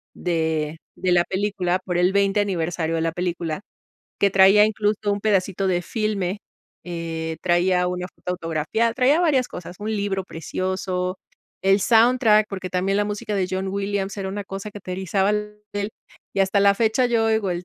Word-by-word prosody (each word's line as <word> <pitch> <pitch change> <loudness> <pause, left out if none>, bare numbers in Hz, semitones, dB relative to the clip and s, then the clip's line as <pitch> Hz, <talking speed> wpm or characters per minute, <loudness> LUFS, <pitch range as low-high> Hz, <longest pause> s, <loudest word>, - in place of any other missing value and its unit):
de 160 -2 -1 0.2
de 185 - +1
la 175 -1 +4
película, 190 -2 0
por 180 -2 -1
el 180 +1 +3
20 200 0 +2
aniversario 165 -4 -1
de 160 - 0
la 165 - 0
película, 175 -1 -3 0.6
que 200 - +4
traía 195 +2 +7
incluso 210 -1 0
un 200 - -1
pedacito 195 -2 +1
de 175 -1 +1
filme, 205 -3 -2 0.5
eh, 165 -2 -4
traía 180 +1 +2
una 180 0 -3
foto 180 - -6
autografia 165 +7 -1
traía 275 +6 +4
varias 275 -7 +2
cosas, 180 0 -8
un 215 +1 -3
libro 200 -2 -1
precioso, 185 +2 -3 0.5
el 195 +1 +4
soundtrack, 225 -1 +4
porque, 190 -2 -5
también 190 +2 +1
la 205 - +2
música 205 0 -3
de 190 -2 +1
John 190 +1 -2
Williams 200 0 -2
era 195 - -3
una 205 +1 -4
cosa 195 +2 -6
que 205 - -9
te 185 - -5
erizaba 190 +2 0
la 210 0 -2 0.2
piel 205 +1 -2 0.4
y 195 - +1
hasta 195 +1 +3
la 200 0 +5
fecha, 225 +4 +2
yo 230 -2 +2
oigo 220 -3 +1
el 175 0 -3
195 Hz, 180 wpm, -23 LUFS, 180-205 Hz, 0.6 s, traía